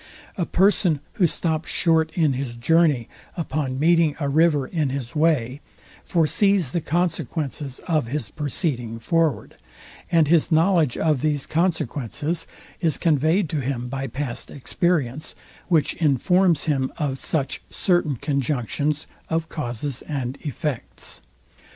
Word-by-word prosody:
A 175 Hz, -, -2 dB
person, 185 Hz, -5 st, +3 dB
who 180 Hz, -, +3 dB
stops 160 Hz, 0 st, -2 dB
short 160 Hz, -2 st, +2 dB
in 155 Hz, -5 st, +3 dB
his 130 Hz, -2 st, -4 dB
journey 145 Hz, -1 st, +3 dB, 0.3 s
upon 145 Hz, -5 st, -2 dB
meeting 165 Hz, 0 st, +3 dB
a 140 Hz, -2 st, -1 dB
river 150 Hz, -1 st, +3 dB
in 150 Hz, -1 st, -1 dB
his 130 Hz, -3 st, -5 dB
way, 150 Hz, -4 st, +1 dB, 0.4 s
foresees 180 Hz, -1 st, +2 dB
the 170 Hz, -, -1 dB
consequences 155 Hz, -5 st, -2 dB
of 155 Hz, -8 st, +1 dB
his 130 Hz, -4 st, -3 dB
proceeding 140 Hz, -6 st, -1 dB
forward; 165 Hz, +5 st, 0 dB, 0.5 s
and 165 Hz, -3 st, +4 dB
his 165 Hz, +1 st, +3 dB
knowledge 160 Hz, -4 st, +3 dB
of 155 Hz, -5 st, +1 dB
these 150 Hz, -3 st, 0 dB
consequences 155 Hz, -, -1 dB, 0.3 s
is 165 Hz, -5 st, +1 dB
conveyed 160 Hz, +4 st, +2 dB
to 155 Hz, -, -1 dB
him 125 Hz, -2 st, -3 dB
by 135 Hz, +1 st, -3 dB
past 130 Hz, 0 st, -4 dB
experience, 150 Hz, -1 st, -1 dB, 0.3 s
which 165 Hz, -5 st, +2 dB
informs 170 Hz, +3 st, +3 dB
him 135 Hz, -4 st, 0 dB
of 140 Hz, -4 st, -2 dB
such 140 Hz, -4 st, 0 dB
certain 175 Hz, -6 st, +1 dB
conjunctions 140 Hz, +2 st, -1 dB, 0.2 s
of 165 Hz, 0 st, -1 dB
causes 130 Hz, -2 st, -4 dB
and 135 Hz, -3 st, -3 dB
effects. 150 Hz, -2 st, -5 dB
150 Hz, 125 wpm, -23 LUFS, 135-165 Hz, 0.5 s, and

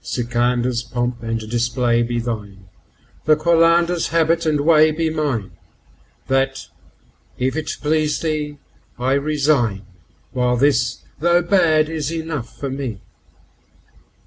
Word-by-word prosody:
Sikandar's3 120 Hz, 0 st, -1 dB
pomp 120 Hz, -1 st, -2 dB
and 115 Hz, 0 st, -2 dB
display 120 Hz, +1 st, +1 dB
be 120 Hz, 0 st, -1 dB
thine, 105 Hz, -5 st, -5 dB, 0.6 s
the 155 Hz, -, +5 dB
Qalandar's4 170 Hz, +2 st, +3 dB
habit 165 Hz, 0 st, +1 dB
and 150 Hz, -2 st, +1 dB
way 155 Hz, 0 st, +5 dB
be 160 Hz, +1 st, -1 dB
mine; 140 Hz, -11 st, -2 dB, 0.7 s
That, 135 Hz, 0 st, -1 dB, 0.7 s
if 130 Hz, +2 st, -1 dB
it 160 Hz, -1 st, -3 dB
please 150 Hz, 0 st, +1 dB
thee, 150 Hz, -2 st, -3 dB, 0.4 s
I 130 Hz, +2 st, 0 dB
resign, 140 Hz, -8 st, +1 dB, 0.5 s
while 125 Hz, -1 st, +1 dB
this, 120 Hz, -3 st, +1 dB, 0.2 s
though 175 Hz, +2 st, +3 dB
bad, 165 Hz, -4 st, +3 dB
is 160 Hz, -1 st, -3 dB
enough 160 Hz, -7 st, -5 dB
for 140 Hz, -2 st, -4 dB
me. 130 Hz, -7 st, -5 dB
140 Hz, 120 wpm, -20 LUFS, 120-155 Hz, 0.7 s, the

